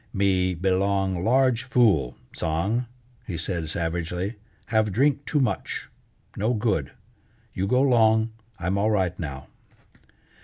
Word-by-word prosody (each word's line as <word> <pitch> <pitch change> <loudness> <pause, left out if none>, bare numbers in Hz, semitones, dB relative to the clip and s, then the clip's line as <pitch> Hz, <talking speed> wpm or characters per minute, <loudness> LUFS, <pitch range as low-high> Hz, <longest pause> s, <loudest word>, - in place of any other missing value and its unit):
"Me 95 -2 +2
belong 95 0 +1
large 125 +1 +3
fool, 110 - +2 0.2
Tsang!" 95 +10 -1 0.4
he 90 - -3
said 80 -1 -3
savagely. 85 +4 -2 0.3
"Have 110 -2 +1
drink 140 +6 +1
too 150 - +1
much. 130 - -2 0.5
No 110 +5 0
good. 100 - 0 0.6
You 95 +1 -1
go 125 +5 +3
'long, 110 -3 +4 0.3
I'm 95 +3 -1
all 105 +2 +2
right 95 -4 0
now." 70 -5 -5
100 Hz, 120 wpm, -25 LUFS, 90-115 Hz, 0.6 s, long